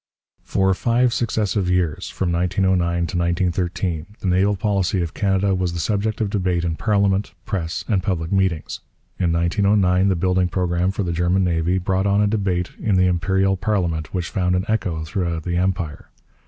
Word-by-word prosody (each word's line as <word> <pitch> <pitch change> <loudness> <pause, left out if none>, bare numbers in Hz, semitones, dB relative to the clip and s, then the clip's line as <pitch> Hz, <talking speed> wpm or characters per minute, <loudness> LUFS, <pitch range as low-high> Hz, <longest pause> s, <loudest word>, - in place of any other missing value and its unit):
For 95 0 +1
five 120 +4 +1
successive 105 -4 0
years, 90 -4 0
from 90 -2 -2
1909 90 0 +1
to 90 - -3
1913, 85 -1 -1
the - - -9
naval 95 +3 +2
policy 95 -2 0
of 85 - -5
Canada 95 -1 +1
was 90 -2 -1
the 85 - -4
subject 105 +3 -1
of 105 -3 -1
debate 90 -4 0
in 85 -2 -1
parliament, 100 -1 +1
press, 90 -5 -3
and 100 -4 +1
public 85 -3 -2
meetings. 95 -5 0 0.4
In 85 -2 +1
1909 95 +2 +2
the 95 - +2
building 90 +1 +1
programme 90 0 0
for 100 +1 -2
the 85 -2 -2
German 90 +3 +1
navy 85 +1 +1
brought 95 +1 0
on 100 +1 +2
a 105 - +4
debate 95 -4 -1
in 105 -3 +1
the 90 0 +4
Imperial 95 +2 +1
parliament 90 -5 -1
which 90 -3 -3
found 90 -2 +1
an 90 +1 0
echo 95 -8 -1
throughout 85 -1 -2
the 85 0 -2
Empire. 90 -4 -2
95 Hz, 175 wpm, -21 LUFS, 85-100 Hz, 0.4 s, a